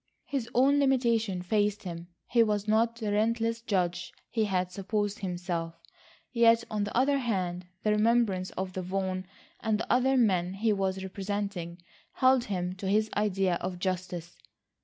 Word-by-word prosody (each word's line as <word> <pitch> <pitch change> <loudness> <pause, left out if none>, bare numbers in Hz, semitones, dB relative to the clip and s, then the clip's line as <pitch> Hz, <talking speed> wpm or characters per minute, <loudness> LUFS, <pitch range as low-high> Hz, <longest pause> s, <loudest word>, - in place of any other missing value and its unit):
His 260 -5 -3
own 275 +3 +5
limitations 230 -9 +1
faced 210 +1 +1
him. 170 -2 -6 0.2
He 235 - +3
was 210 -2 +1
not 225 +2 +2
the 220 -3 -3
relentless 230 +2 +1
judge 180 -5 -1 0.2
he 225 -2 +1
had 185 -2 -1
supposed 205 +2 -2
himself. 175 -3 -3 0.6
Yet 230 -1 +5
on 210 -1 0
the 205 - -3
other 275 +2 +3
hand, 185 -7 -2 0.2
the 215 - +2
remembrance 210 -4 +2
of 190 0 -2
Vaughan 185 0 -3 0.3
and 220 -2 0
the - - 0
other 260 +2 +3
men 185 -6 +2
he 215 +2 +2
was 190 -1 -1
representing 190 -3 -4 0.3
held 260 -1 +4
him 180 -3 -2
to 190 - -5
his 215 +2 +2
idea 195 -4 +1
of 180 -1 -3
justice. 180 -2 -3
205 Hz, 155 wpm, -29 LUFS, 185-230 Hz, 0.6 s, own